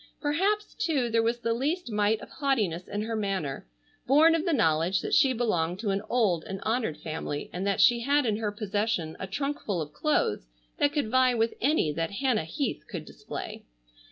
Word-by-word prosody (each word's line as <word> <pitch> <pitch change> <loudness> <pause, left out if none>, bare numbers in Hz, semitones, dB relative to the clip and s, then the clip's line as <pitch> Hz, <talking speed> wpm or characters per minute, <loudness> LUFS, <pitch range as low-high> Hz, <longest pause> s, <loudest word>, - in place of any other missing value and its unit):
Perhaps 390 +8 0
too 285 - 0
there 230 0 +3
was 230 +1 +1
the 230 - +1
least 290 +4 -2
mite 210 +1 +2
of - - -10
haughtiness 215 - -1
in 205 +1 -3
her 225 +1 -3
manner, 190 - -2 0.4
born 305 +5 +6
of 330 +1 0
the 345 - +1
knowledge 175 - +2
that - - -4
she 270 - +5
belonged 185 -9 0
to 205 0 -1
an 195 +1 0
old 210 -9 +2
and 195 0 -5
honored 220 -8 -1
family, 155 -1 -5
and 185 +3 -2
that 200 - +1
she 240 -1 +6
had 285 +3 +2
in 215 -3 +1
her 215 -2 -2
possession 205 -5 -2
a 190 - -4
trunk 280 +9 -2
full 195 -5 -2
of 150 -2 -5
clothes 150 - 0 0.3
that 285 - +3
could 290 -7 -1
vie 255 -1 +4
with 225 0 +1
any 275 - +2
that 165 +4 -3
Hannah 245 - +1
Heath 235 - -3
could - - -6
display. - - -7
225 Hz, 200 wpm, -28 LUFS, 185-270 Hz, 0.4 s, born